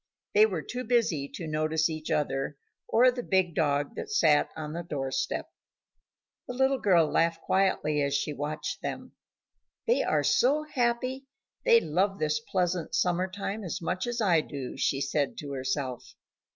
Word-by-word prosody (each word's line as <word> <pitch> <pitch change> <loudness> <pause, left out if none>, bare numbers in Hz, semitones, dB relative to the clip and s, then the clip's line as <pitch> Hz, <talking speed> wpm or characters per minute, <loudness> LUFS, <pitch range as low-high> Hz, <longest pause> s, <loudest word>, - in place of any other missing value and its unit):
They 215 +1 +7
were 180 -7 -3
too 250 +1 -5
busy 215 - +1
to 170 - -5
notice 155 +1 +1
each 155 -1 -5
other 145 -2 -1 0.3
or 250 +2 +5
the 245 0 -4
big 190 -6 +1
dog 145 -2 0
that 440 - -5
sat 155 - +4
on 155 -1 -5
the 170 - -3
door 140 -6 -4
step. 130 0 -2 1.0
The 250 - -5
little 265 +1 +2
girl 175 -7 +4
laughed 165 +1 +1
quietly 155 -6 +1
as 140 0 0
she 150 +1 -1
watched 145 +2 -4
them. - - -5 0.7
"They 475 +1 +3
are - - +1
so 290 +5 +3
happy; 255 -1 -1 0.4
they 230 - +7
love 190 +3 0
this 155 +1 0
pleasant 180 -6 -1
summer 180 +1 +1
time 200 +2 -4
as 180 +1 -4
much 185 +4 -2
as 240 0 -2
I 175 -6 +4
do," 140 -4 -6
she 135 - 0
said 140 0 -1
to 145 -1 -6
herself. 130 -1 -3
170 Hz, 165 wpm, -28 LUFS, 150-220 Hz, 1.0 s, They